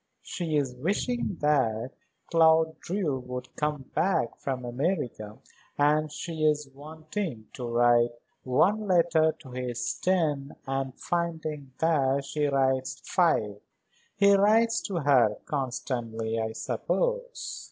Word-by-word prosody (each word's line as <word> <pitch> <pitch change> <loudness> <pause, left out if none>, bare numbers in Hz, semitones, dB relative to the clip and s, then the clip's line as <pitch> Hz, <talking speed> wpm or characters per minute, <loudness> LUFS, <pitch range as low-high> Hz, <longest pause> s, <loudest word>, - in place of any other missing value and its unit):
She 160 -4 -2
is 135 -3 0
wishing 200 - -1
that 130 -5 +1 0.4
Claude 160 -1 +4
Drew 170 -8 -2
would 125 0 -7
come 150 -2 -1
back 175 -9 +1
from 130 -2 -3
America, 120 - -2 0.4
and 150 +1 +2
she 160 +1 -5
is 150 -2 +1
wanting 155 - -6
to 125 -2 -5
write 120 0 +4 0.3
one 200 +12 +2
letter 170 -3 +4
to 130 -4 -14
his 125 -1 -3
ten 155 -7 0
and 135 -1 -2
finding 160 -5 -3
that 140 -4 +2
she 150 +1 -1
writes 130 -1 +1
five. 110 - +1 0.6
He 200 -1 +6
writes 220 +3 +4
to 185 -5 -2
her 125 -7 +4
constantly, 120 -5 -3
I 110 0 -2
suppose?" - - -2
145 Hz, 120 wpm, -28 LUFS, 125-170 Hz, 0.6 s, He